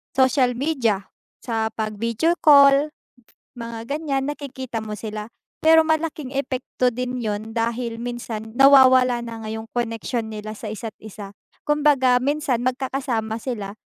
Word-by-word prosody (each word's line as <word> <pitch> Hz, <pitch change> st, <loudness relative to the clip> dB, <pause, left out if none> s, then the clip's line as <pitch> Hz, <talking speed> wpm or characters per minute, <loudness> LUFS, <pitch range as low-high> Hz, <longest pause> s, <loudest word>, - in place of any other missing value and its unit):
social 260 Hz, -1 st, +3 dB
media, 240 Hz, -8 st, -1 dB, 0.3 s
sa 225 Hz, -2 st, -1 dB
pag-video 230 Hz, +10 st, -1 dB
call, 285 Hz, 0 st, +6 dB, 0.7 s
mga 230 Hz, -1 st, -6 dB
ganyan 290 Hz, -2 st, -1 dB
nakikita 260 Hz, -5 st, -6 dB
mo 215 Hz, -1 st, -5 dB
sila. 210 Hz, +1 st, -6 dB, 0.3 s
Pero 320 Hz, 0 st, +6 dB
malaking 315 Hz, -4 st, -2 dB
epekto 260 Hz, -2 st, -1 dB
din 250 Hz, +1 st, -4 dB
'yun 215 Hz, 0 st, -4 dB
dahil 230 Hz, 0 st, -2 dB
minsan 235 Hz, -2 st, -5 dB
nawawala 260 Hz, -2 st, +6 dB
na 230 Hz, -1 st, -7 dB
nga -, -, -5 dB
'yong 220 Hz, 0 st, -7 dB
koneksyon 230 Hz, 0 st, -3 dB
nila 215 Hz, 0 st, -6 dB
sa 215 Hz, -1 st, -6 dB
isa't 220 Hz, 0 st, -7 dB
isa. 205 Hz, -2 st, -10 dB, 0.3 s
Kumbaga, 290 Hz, -4 st, +3 dB
minsan, 285 Hz, 0 st, 0 dB
magkakasama 255 Hz, -4 st, -2 dB
sila 215 Hz, -4 st, -5 dB
245 Hz, 130 wpm, -22 LUFS, 225-275 Hz, 0.7 s, call